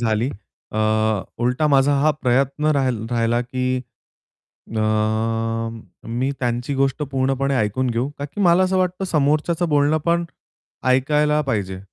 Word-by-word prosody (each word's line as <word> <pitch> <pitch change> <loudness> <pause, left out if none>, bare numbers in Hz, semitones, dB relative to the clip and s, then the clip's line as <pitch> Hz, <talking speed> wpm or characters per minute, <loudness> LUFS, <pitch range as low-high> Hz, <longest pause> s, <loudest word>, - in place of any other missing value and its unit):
झाली. 115 +1 +1 0.4
अ, 110 - -2 0.7
उलटा 125 +5 +1
माझा 135 +1 +4
हा 155 +2 +4
प्रयत्न 135 +4 +1
राहिल 120 -5 -1
राहिला, 120 0 +1
की 130 +1 -2 1.0
अ, - - +1 1.3
मी 125 +4 -1
त्यांची 120 +2 -1
गोष्ट 135 +1 0
पूर्णपणे 135 0 0
ऐकून 110 +4 0
घेऊ, 120 +3 -1
का 140 - -4
की 150 +8 -6
मला 175 +1 +5
असं 185 0 +1
वाटतं, 185 +1 -1
समोरच्याचं 155 +1 +1
बोलणं 155 +3 +2 0.7
ऐकायला 150 +4 +3
पाहिजे. 95 -3 -2
135 Hz, 125 wpm, -21 LUFS, 120-150 Hz, 1.3 s, मला